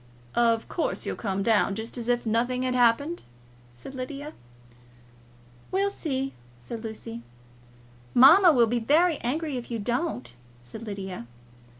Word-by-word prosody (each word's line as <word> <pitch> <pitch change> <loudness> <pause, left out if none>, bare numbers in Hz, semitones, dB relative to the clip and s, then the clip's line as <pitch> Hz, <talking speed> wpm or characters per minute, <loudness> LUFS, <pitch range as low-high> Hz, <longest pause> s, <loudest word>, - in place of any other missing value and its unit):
"Of 230 -1 +2
course, 340 - -2
you'll - - -2
come 195 -2 -2
down, 210 -2 +2
just 220 +2 -6
as 240 -1 -4
if 240 -1 +1
nothing 245 +3 0
had 255 0 0
happened," 250 +7 +2 0.5
said 120 - -11
Lydia. 275 +3 -6 1.4
"We'll 395 +1 +1
see," 270 -7 -3 0.3
said 220 - -7
Lucy. 215 - -7 0.9
"Mamma 330 +9 +8
will 245 -5 +5
be 240 +2 0
very 310 +7 +3
angry 290 +3 -2
if 240 - -7
you 235 - -2
don't," 210 - -2 0.3
said 125 - -10
Lydia. 190 - -6
240 Hz, 135 wpm, -26 LUFS, 220-280 Hz, 1.4 s, Mamma